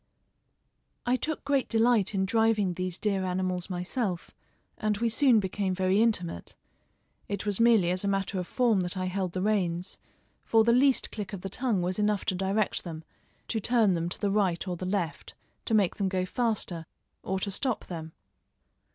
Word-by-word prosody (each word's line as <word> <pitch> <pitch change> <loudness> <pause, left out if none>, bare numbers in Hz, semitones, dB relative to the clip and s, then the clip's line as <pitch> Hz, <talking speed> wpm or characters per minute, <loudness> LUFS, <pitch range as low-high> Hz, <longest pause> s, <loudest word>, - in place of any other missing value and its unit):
I 245 +1 +3
took 305 +3 -3
great 280 -2 +1
delight 225 -3 +3
in 190 0 +1
driving 220 -2 +2
these 185 0 -3
dear 200 -3 0
animals 185 0 -1
myself, 180 0 -3 0.5
and 215 -2 0
we 230 +2 +1
soon 235 0 +4
became 190 -1 -1
very 190 +2 +2
intimate. 180 - 0 0.7
It 200 0 -4
was 205 -1 -1
merely 225 -7 +5
as 185 +1 -1
a - - 0
matter 195 -1 -1
of 180 - -4
form 235 -5 +2
that 180 +1 -2
I 185 - -1
held 185 -1 -2
the 185 - -2
reins, 185 -4 -1 0.4
for 225 -1 +4
the 235 +1 +4
least 265 +1 +3
click 210 -2 -6
of 195 - -5
the 195 - -5
tongue 230 -6 0
was 185 +3 -2
enough 210 -1 +1
to - - +1
direct 195 +3 0
them, 165 -2 -7 0.5
to 225 - 0
turn 220 -3 +3
them 170 0 -1
to - - -6
the 200 -2 0
right 195 -3 +1
or 180 - -2
the 180 +2 -5
left, 185 -4 -3 0.3
to 225 - +1
make 200 -4 +2
them 195 -2 0
go 185 -1 0
faster, 195 -6 -2 0.3
or 190 0 -2
to 200 +1 -2
stop 255 +4 -1
them. 160 -2 -7
195 Hz, 185 wpm, -28 LUFS, 185-220 Hz, 0.7 s, merely